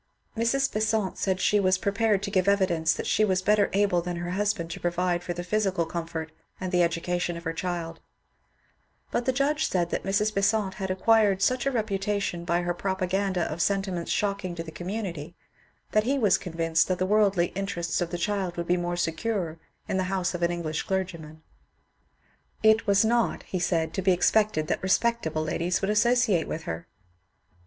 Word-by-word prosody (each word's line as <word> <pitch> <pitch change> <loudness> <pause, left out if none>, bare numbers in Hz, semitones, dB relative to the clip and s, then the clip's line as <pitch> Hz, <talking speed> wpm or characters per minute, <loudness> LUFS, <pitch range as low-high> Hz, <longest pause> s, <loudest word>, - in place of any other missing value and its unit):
Mrs. 240 +4 +1
Besant 215 -2 0
said 190 -1 0
she 210 +2 +3
was 185 -1 +3
prepared 200 +1 +1
to 200 - -3
give 185 -1 +1
evidence 180 -5 +2
that - - -3
she 215 - +2
was 185 -3 +1
better 210 0 +3
able 195 -3 +2
than 175 0 -4
her 175 +1 -4
husband 190 -4 -1
to - - -6
provide 175 0 0
for 175 - -4
the 175 +1 -5
physical 190 -3 0
comfort 165 -1 -5 0.3
and 185 -1 -4
the 180 - +2
educa 175 +1 0
tion 175 -1 -2
of 170 - -9
her 165 -1 -2
child; 165 -1 -4 1.1
but 240 - -1
the 260 - +3
judge 285 +4 +1
said 175 -2 0
that - - -1
Mrs. 205 +3 0
Besant 200 0 +1
had 190 - -2
acquired 195 0 +3
such 255 +4 +1
a - - +2
reputation 200 -5 -2
by 175 +1 +1
her 175 0 0
propaganda 190 0 -1
of 170 0 -2
sentiments 195 -3 -1
shocking 200 -3 -1
to 165 - -4
the 160 - -9
community 175 -3 -5 0.6
that 215 0 +2
he 275 +3 +1
was 210 -8 +4
convinced 165 -2 0
that 185 - 0
the 185 - 0
worldly 195 -3 +2
interests 195 -4 -2
of 175 - -1
the 175 - -3
child 190 -1 -2
would 170 - -2
be 180 +1 +2
more 175 0 -2
secure 170 0 -2 0.3
in - - -1
the 185 - 0
house 190 -2 -1
of 175 - -4
an 170 - +2
English 165 -3 -2
clergyman. 170 -6 -4 1.2
It 220 +1 +4
was 200 +2 +4
not, 235 +1 +1
he 185 - -4
said, 165 -2 0
to 190 - -2
be 190 0 +4
expected 205 -2 +2
that - - -2
respectable 190 -5 +1
ladies 170 +3 -1
would 195 +1 0
associate 215 -5 +3
with 160 - -4
her. 80 - -5
185 Hz, 190 wpm, -27 LUFS, 170-205 Hz, 1.2 s, was